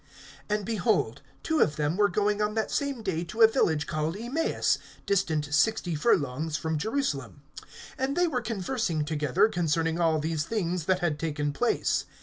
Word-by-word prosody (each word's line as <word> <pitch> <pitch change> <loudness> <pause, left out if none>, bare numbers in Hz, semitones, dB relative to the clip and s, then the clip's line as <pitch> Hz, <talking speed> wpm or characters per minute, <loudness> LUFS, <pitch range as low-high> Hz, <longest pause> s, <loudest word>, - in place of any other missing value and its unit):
(13)And, 210 -1 0
behold, 205 - 0 0.2
two 320 -1 0
of 150 - +3
them 150 +2 0
were 205 +1 +3
going 210 0 +1
on 210 +1 0
that 220 - -1
same 280 -5 -2
day 175 -5 -1
to 220 +6 +2
a - - +11
village 160 - +1
called 155 +3 -2
Emmaus, 250 +9 0 0.3
distant 155 -7 0
sixty 175 +3 +2
furlongs 155 - +1
from 160 +2 -2
Jerusalem. 150 - -2 0.6
(14)And 265 +2 0
they 355 0 +3
were 255 -6 -1
conversing 210 - -2
together 150 +3 +2
concerning 165 -3 0
all 165 -2 +3
these 155 0 -1
things 180 -5 -2
that 185 0 +1
had 155 -4 0
taken 150 -2 -2
place. 240 +10 0
175 Hz, 165 wpm, -27 LUFS, 155-220 Hz, 0.6 s, a